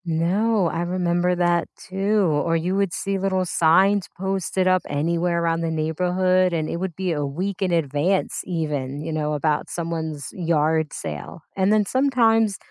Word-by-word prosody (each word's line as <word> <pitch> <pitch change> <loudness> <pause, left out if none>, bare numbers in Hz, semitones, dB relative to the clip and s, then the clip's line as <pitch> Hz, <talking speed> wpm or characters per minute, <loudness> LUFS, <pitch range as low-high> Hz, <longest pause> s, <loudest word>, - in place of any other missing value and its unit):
No, 185 +6 +1
I 165 - -2
remember 175 0 0
that 175 -1 +1
too, 195 +2 0
or 160 +1 +1
you 175 +3 0
would 200 -2 +1
see 195 +2 -2
little 190 -1 0
signs 185 +4 +3
posted 190 0 -1
up 185 0 +3
anywhere 170 +3 0
around 165 0 0
the 165 - -1
neighborhood 180 +3 +1
and 160 -2 -1
it - - -3
would 180 -2 -4
be 185 0 -2
a 150 -3 -1
week 180 +8 -3
in 185 -2 +1
advance, 165 +3 0
even, 150 -5 -3
you 160 - -4
know, 150 -1 -1
about 150 0 0
someone's 160 -4 -4
yard 160 -3 +1
sale 80 - -7
and 190 +1 +2
then 215 -1 +3
sometimes 225 -5 +2
175 Hz, 165 wpm, -23 LUFS, 160-190 Hz, -, signs